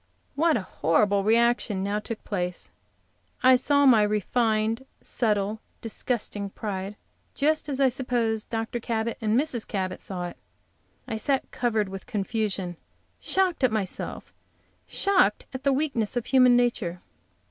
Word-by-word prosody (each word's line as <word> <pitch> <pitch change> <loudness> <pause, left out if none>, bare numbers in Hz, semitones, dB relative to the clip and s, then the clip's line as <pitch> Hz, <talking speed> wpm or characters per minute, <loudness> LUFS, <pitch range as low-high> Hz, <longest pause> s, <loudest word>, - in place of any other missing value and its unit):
What 320 0 +3
a 205 - -4
horrible 195 +4 +2
reaction 230 -2 +2
now 205 +1 -1
took 215 +1 -6
place! 180 -3 -3 0.7
I 255 0 +8
saw 285 +3 +3
my 240 -5 +7
refined, 220 +3 +1
subtle, 210 -2 -1 0.2
disgusting 215 -3 -3
pride, 195 -1 -5 0.4
just 305 +1 +1
as 275 -1 -2
I 270 -1 +5
suppose 240 -4 -1
Dr. 225 +1 -3
and 225 0 0
Mrs. 265 -6 -1
Cabot 185 -3 -3
saw 180 -2 -5
it! - - -13 0.7
I 225 -3 -3
sat 270 +4 0
covered 220 -4 0
with 190 +2 -8
confusion, 200 -5 -2 0.4
shocked 370 -6 +1
at 255 - +4
myself, 205 -4 -3 0.5
shocked 375 - +2
at 260 - -5
the 280 - +3
weakness 260 -6 0
of 240 - -1
human 255 -2 +5
nature. 220 -8 0
225 Hz, 135 wpm, -26 LUFS, 205-255 Hz, 0.7 s, I